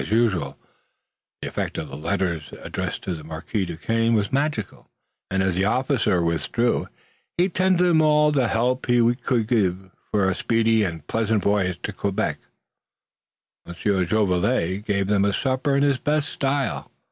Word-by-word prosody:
As - - -6
usual 105 -11 +1 0.9
the - - -3
effect - - -3
of 75 - -4
the 70 - -8
letters 85 0 -2
addressed - - -4
to 95 - -3
the 80 -2 -7
Marquis 80 +5 -3
Duquesne 115 +7 0
was 105 +1 0
magical, 140 -7 -2 0.4
and, 95 0 +1
as 95 -1 +1
the 95 +3 +1
officer 115 - +1
withdrew, 85 +9 0 0.5
he 180 +2 +3
tendered 185 0 +2
them 165 -2 +4
all 150 -1 +4
the 135 -5 +2
help 125 +4 0
he 120 -1 +4
could 120 -2 -1
give 95 -5 0 0.2
for 100 -3 +2
a 95 - +2
speedy 115 +2 +2
and 80 -6 -4
pleasant 110 0 0
voyage 100 -3 +1
to - - -3
Quebec. 100 -1 -2 1.3
Monsieur 95 +2 0
Jolivet 90 -2 +1
gave 100 -1 +1
them 100 0 +2
a 100 - +2
supper 135 +4 0
in 140 - +2
his 140 -2 +2
best 150 -1 0
style. 140 0 -2
110 Hz, 160 wpm, -23 LUFS, 95-130 Hz, 1.3 s, them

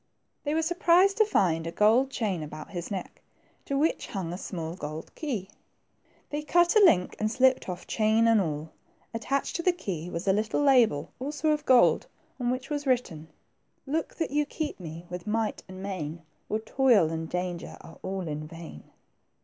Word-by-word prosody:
They 295 +1 -1
were 320 - +2
surprised 355 +4 +4
to 435 - +5
find 165 - +1
a - - -3
gold 220 +8 +4
chain 205 -10 -2
about 155 +4 -8
his 175 -2 -5
neck, 190 -4 -6 0.4
to 275 - -1
which 310 +4 +1
hung 180 -4 -4
a - - -4
small 165 -4 -5
gold 155 -1 -7
key. 240 - -3 0.8
They 295 +1 -2
cut 345 +4 +3
a 430 - +7
link, 180 - +4
and 215 - +1
slipped 260 -2 +3
off 180 -1 -5
chain 220 +1 +2
and 225 -2 +5
all. 155 -2 -3 0.4
Attached 270 +5 -1
to - - -2
the 365 - +4
key 180 - -5
was 170 +2 -5
a 190 - +5
little 215 +7 0
label, 235 - +4
also 295 +3 -1
of 300 0 -1
gold, 255 -2 +5 0.3
on 245 -1 0
which 255 +3 -3
was 290 -1 -2
written, 175 -12 0 0.2
— - - -46
" - - -45
Look 320 - -2
that 325 - -2
you 295 +1 +2
keep 305 -4 -4
me 165 0 -8
with 180 +2 -7
might 220 0 -1
and 185 0 -9
main, 170 -4 -5 0.3
Or 215 - +1
toil 220 -7 +3
and 160 0 -4
danger 180 -1 -4
are 165 - -13
all 190 -2 -4
in 150 0 -4
vain." 165 - -10
210 Hz, 190 wpm, -28 LUFS, 170-275 Hz, 0.8 s, a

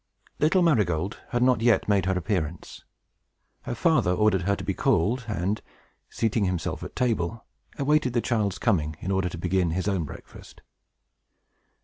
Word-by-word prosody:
Little 170 +5 +3
Marygold 100 - +1
had 120 0 +1
not 125 -3 +3
yet 120 -1 +3
made 100 -3 +2
her 95 -1 +1
appearance. 85 -4 -3 0.8
Her - - -3
father - - +2
ordered 100 -1 +2
her 100 - +3
to - - -7
be - - -1
called, 115 +9 +1
and, 105 0 -2 0.5
seating 110 -2 0
himself 90 -4 -2
at - - -8
table, 115 -3 -1 0.3
awaited 140 -3 +2
the 120 - +2
child's 105 -6 0
coming, 80 -9 0
in 95 - -3
order 95 -2 +1
to 85 - -7
begin 90 +1 0
his 90 +4 -2
own 95 -5 0
breakfast. - - -12
100 Hz, 155 wpm, -26 LUFS, 90-115 Hz, 0.8 s, Little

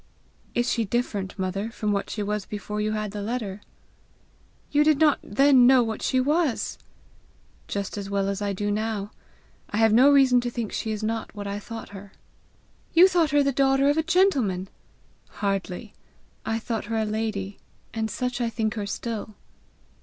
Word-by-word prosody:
"Is 240 0 +1
she 230 - +1
different, 205 -3 -2
mother, 195 +3 -2
from 215 -2 -2
what 200 -1 -1
she 210 - -3
was 210 -1 -3
before 210 0 -4
you 215 0 0
had 215 -1 -3
the 205 0 -5
letter?" 210 -2 -4 1.1
"You 295 0 +4
did 305 -1 +4
not 300 -1 +4
then 260 +2 +5
know 255 -1 +6
what 225 -1 -4
she 260 - +1
was!" 295 0 0 0.9
"Just 200 0 -3
as 200 -1 -6
well 200 -1 0
as 200 +1 -2
I 205 -1 -1
do 205 +2 -2
now. 210 -1 -2 0.6
I 205 - -3
have 225 -1 +4
no 255 +5 +7
reason 265 -3 +5
to 240 - -2
think 235 -3 -4
she 220 - -3
is 215 0 -3
not 225 +1 -3
what 205 -1 -6
I 200 +1 -3
thought 225 +2 -8
her." 200 -1 -11 0.8
"You 350 +3 +9
thought 345 -4 +2
her 290 0 +3
the 275 - +2
daughter 275 +1 +3
of 290 - -1
a - - +4
gentleman!" 275 - +2 0.6
"Hardly. 195 +1 -3 0.5
I 225 - 0
thought 225 -1 -3
her 225 +1 -2
a 220 - +1
lady, 210 -2 -3 0.3
and 220 -1 -2
such 250 0 -3
I 235 - +1
think 220 -1 -1
her 210 -3 -4
still." 215 0 -5
220 Hz, 185 wpm, -25 LUFS, 205-255 Hz, 1.1 s, You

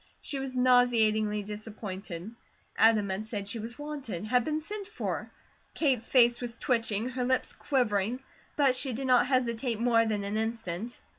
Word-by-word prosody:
She 275 - -4
was 265 -1 -5
nauseatingly 225 -4 +3
disappointed. 205 -3 -7 0.4
Adam 220 -2 +4
had 205 +3 -3
said 205 -3 -4
she 225 +3 -3
was 230 +2 -7
wanted, 280 - -5
had 245 +2 +2
been 305 +4 -1
sent 400 +5 -6
for. 430 - -4 0.5
Kate's 265 -7 +1
face 240 -2 +5
was 240 -1 -4
twitching, 230 -2 0
her 255 0 -3
lips 260 +1 0
quivering, 240 -3 0 0.4
but 275 -3 +4
she 255 0 +1
did 265 +4 -4
not 250 -1 +4
hesitate 245 -3 0
more 230 -1 +4
than 210 -2 -1
an 200 +2 -2
instant. 225 -1 -3
235 Hz, 160 wpm, -29 LUFS, 215-255 Hz, 0.5 s, face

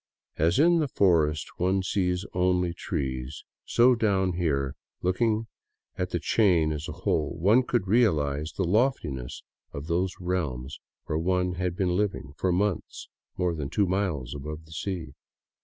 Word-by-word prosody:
As 85 +4 +2
in 170 +3 +5
the 155 - +1
forest 80 - +2
one 95 +2 +1
sees 90 0 0
only 90 -1 +1
trees, 65 -3 -4 0.2
so 120 +2 +5
only 125 - +4
down 95 -4 +2
here, 70 -6 -1 0.3
looking 110 +5 +1 0.5
at - - -2
the - - -1
chain 90 -8 +3
as 75 +1 -5
a - - -4
whole, 75 -2 -1 0.3
could 120 -4 +1
one 95 - -9
realize 75 - +2
the 95 - -1
loftiness 90 - 0 0.3
of 70 +1 -6
those 90 +3 0
realms 75 -8 -3 0.3
where 80 - -1
one 90 +1 +1
had 90 -1 -2
been 90 -2 0
living 95 -8 -2
for 90 +3 0
months 95 +1 -1 0.3
more 90 -2 +1
than 75 -4 -4
two 100 - +2
miles 90 -9 -1
above 75 +2 -7
the 80 - -18
sea. 80 -2 -4
90 Hz, 155 wpm, -27 LUFS, 75-95 Hz, 0.5 s, in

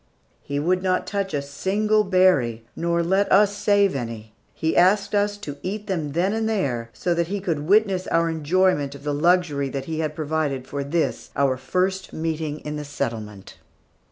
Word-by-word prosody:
He 140 - -4
would 180 +5 +1
not 185 -1 0
touch 200 -1 -2
a 145 -1 -2
single 210 +9 +1
berry, 180 - +2
nor 170 0 0
let 190 +4 +1
us 205 +1 +5
save 205 -3 +3
any. 115 -4 -6 0.2
He 160 - -1
asked 190 +4 +3
us 205 0 +1
to 145 -9 -7
eat 205 +3 -4
them 160 -8 -3
then 180 +5 +1
and 220 0 0
there 125 - -1
so 175 +8 -1
that 170 -1 0
he 200 +3 -2
could 160 -6 -2
witness 195 -2 +3
our 165 0 +2
enjoyment 160 -2 +1
of 140 - -12
the 145 0 -1
luxury 155 -3 +2
he 150 +4 -4
had 155 -1 -2
provided 150 -4 -2
for 140 0 -4
this, 160 +4 -1
our 135 -2 +2
first 185 +8 -2
meeting 160 -2 -3
in 150 0 -5
the 150 - -4
settlement. 115 -8 -5
165 Hz, 180 wpm, -23 LUFS, 140-190 Hz, 0.2 s, us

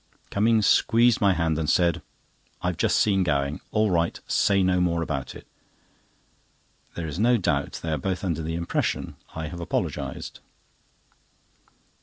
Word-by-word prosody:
Cummings 110 +1 +3
squeezed 115 0 +4
my 100 -2 +4
hand, 80 -2 0
and 80 -1 -1
said: 85 0 +2 0.6
"I've - - -1
just - - +2
seen 100 -2 +3
Gowing. 70 -4 0
All 110 -2 +1
right. 85 -1 0
Say 100 -1 +2
no 90 -1 +2
more 85 -2 +1
about 70 -5 -4
it." - - -11 1.5
There 85 - -4
is 80 +3 -5
no 120 +3 +4
doubt 100 - -1
they 80 - -2
are 75 - -1
both 95 +5 -3
under 85 -4 -1
the 80 +1 -3
impression 85 0 -2 0.2
I 80 -1 -4
have 85 0 -8
apologised. 85 - -4
85 Hz, 150 wpm, -25 LUFS, 80-100 Hz, 1.5 s, squeezed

